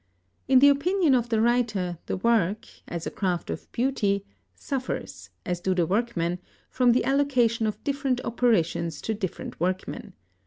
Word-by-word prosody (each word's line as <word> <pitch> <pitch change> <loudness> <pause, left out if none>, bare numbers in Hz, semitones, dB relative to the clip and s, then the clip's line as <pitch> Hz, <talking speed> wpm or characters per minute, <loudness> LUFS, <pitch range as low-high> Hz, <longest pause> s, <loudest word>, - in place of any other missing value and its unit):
In 265 0 +5
the 285 +2 +8
opinion 320 +2 +2
of 240 -2 +1
the 225 -2 +1
writer, 220 -7 +1
the - - -2
work, 210 -1 +1 0.2
as 170 -1 -5
a - - -3
craft 180 -3 -2
of - - -7
beauty, 215 -6 0 0.3
suffers, 260 - -5 0.2
as 180 -1 -2
do 185 +1 0
the 175 -2 +2
workmen, 180 -3 -1 0.3
from 250 -2 +4
the 250 - +1
allocation 250 -5 +2
of 215 - -4
different 275 -3 0
operations 170 -9 +1
to 220 - -2
different 195 -4 -5
workmen. 185 +4 -3
225 Hz, 155 wpm, -26 LUFS, 185-255 Hz, 0.3 s, the